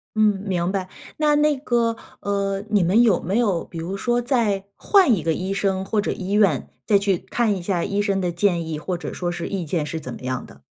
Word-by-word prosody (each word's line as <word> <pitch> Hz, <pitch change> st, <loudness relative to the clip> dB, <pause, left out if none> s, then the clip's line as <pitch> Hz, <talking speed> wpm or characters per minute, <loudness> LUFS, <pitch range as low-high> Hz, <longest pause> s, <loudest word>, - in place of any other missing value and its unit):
嗯， 210 Hz, -2 st, +3 dB
明 185 Hz, -3 st, -1 dB
白。 190 Hz, -2 st, -3 dB, 0.3 s
那 300 Hz, -1 st, +3 dB
那 300 Hz, 0 st, +3 dB
个， 235 Hz, -4 st, +1 dB, 0.3 s
呃， 200 Hz, -1 st, -1 dB
你 205 Hz, -3 st, +3 dB
们 190 Hz, +7 st, +4 dB
有 215 Hz, -7 st, +3 dB
没 190 Hz, +5 st, -1 dB
有 200 Hz, -8 st, +1 dB
比 170 Hz, -, -10 dB
如 170 Hz, +4 st, -4 dB
说 240 Hz, +4 st, 0 dB
再 230 Hz, -6 st, 0 dB
换 380 Hz, -, +4 dB
一 180 Hz, -, -3 dB
个 165 Hz, +1 st, +1 dB
医 185 Hz, +4 st, -2 dB
生 195 Hz, -1 st, 0 dB
或 210 Hz, +1 st, +1 dB
者 -, -, -2 dB
医 190 Hz, 0 st, -5 dB
院， 200 Hz, -9 st, +3 dB, 0.2 s
再 205 Hz, -, +5 dB
去 195 Hz, -2 st, +1 dB
看 225 Hz, -4 st, +1 dB
一 185 Hz, -, -5 dB
下 175 Hz, -1 st, -1 dB
医 200 Hz, 0 st, 0 dB
生 200 Hz, -2 st, 0 dB
的 180 Hz, -2 st, -1 dB
建 170 Hz, -2 st, +1 dB
议， 155 Hz, -2 st, -3 dB
或 180 Hz, +3 st, -3 dB
者 175 Hz, -, -6 dB
说 175 Hz, -1 st, -2 dB
是 175 Hz, -1 st, -4 dB
意 195 Hz, -3 st, -3 dB
见 155 Hz, 0 st, -1 dB
是 160 Hz, +2 st, -4 dB
怎 130 Hz, -5 st, -7 dB
么 -, -, -10 dB
样 130 Hz, 0 st, -3 dB
的？ 70 Hz, 0 st, -16 dB
195 Hz, 255 characters per minute, -23 LUFS, 175-215 Hz, 0.3 s, 再